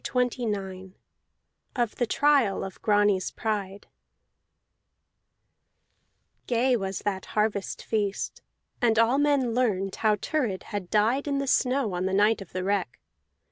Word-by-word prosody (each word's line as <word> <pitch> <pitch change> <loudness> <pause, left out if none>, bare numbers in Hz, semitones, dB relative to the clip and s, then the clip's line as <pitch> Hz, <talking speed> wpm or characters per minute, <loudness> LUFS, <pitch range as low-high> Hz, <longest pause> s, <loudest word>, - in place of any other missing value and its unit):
CHAPTER 250 -1 0
XXIX 190 -2 -5 0.8
OF 240 -4 0
THE 240 - 0
TRIAL 275 -7 +2
OF 190 - -8
GRANTS 205 -3 +2
PRIDE 205 -3 -4 2.6
Gay 250 +1 +2
was 195 -4 -3
that 195 -2 -2
harvest 210 -2 -1
feast, 205 -3 -2 0.4
and 230 -2 +3
all 230 +4 +4
men 285 -5 +2
learned 200 -6 0
how 215 -1 +3
Thurid 220 -4 -2
had 200 -4 -5
died 225 +7 +2
in 280 -1 0
the 275 - -1
snow 255 -4 +1
on 180 +1 -1
the 190 - -2
night 210 +2 +3
of 195 - -10
the 185 0 -3
wreck. 190 -10 -1
210 Hz, 135 wpm, -27 LUFS, 195-245 Hz, 2.6 s, all